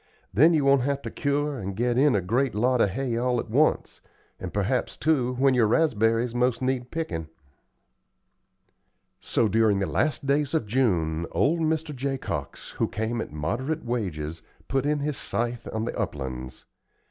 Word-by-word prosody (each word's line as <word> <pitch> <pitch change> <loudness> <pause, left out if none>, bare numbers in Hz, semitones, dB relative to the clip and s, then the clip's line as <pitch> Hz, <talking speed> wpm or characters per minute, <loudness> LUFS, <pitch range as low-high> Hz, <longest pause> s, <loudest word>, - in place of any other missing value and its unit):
Then 160 +8 +6
you 145 -3 +2
won't 140 -1 +5
have 140 +2 -1
to - - -5
cure 145 -1 -1
and 95 -1 -5
get 120 +3 0
in 135 -1 +4
a 100 - +2
great 115 +6 0
lot 125 +3 +2
of 100 - +4
hay 120 +2 -2
all 125 0 +1
at 110 - -6
once, 150 +6 +1 0.4
and - - -5
perhaps, - - -1
too, 130 -5 +1
when 135 +1 +3
your 120 -4 +4
raspberries 115 -3 +2
most 125 0 +1
need 130 -1 -1
pickin'." 85 - -4 1.9
So, 115 - +1
during 110 0 +3
the 100 - 0
last 140 - 0
days 145 +2 +1
of 155 - +1
June, 85 -9 0
old 165 +4 +2
Mr. 160 -2 -1
Jacox, 135 +1 -4
who - - +2
came 110 +3 -2
at - - -6
moderate 125 - -3
wages, 85 -10 -3 0.3
put 135 +1 0
in 150 -1 +1
his 145 -1 -2
scythe 120 0 -2
on 110 0 -2
the - - -4
uplands. 65 -2 -5
125 Hz, 170 wpm, -26 LUFS, 105-140 Hz, 1.9 s, Then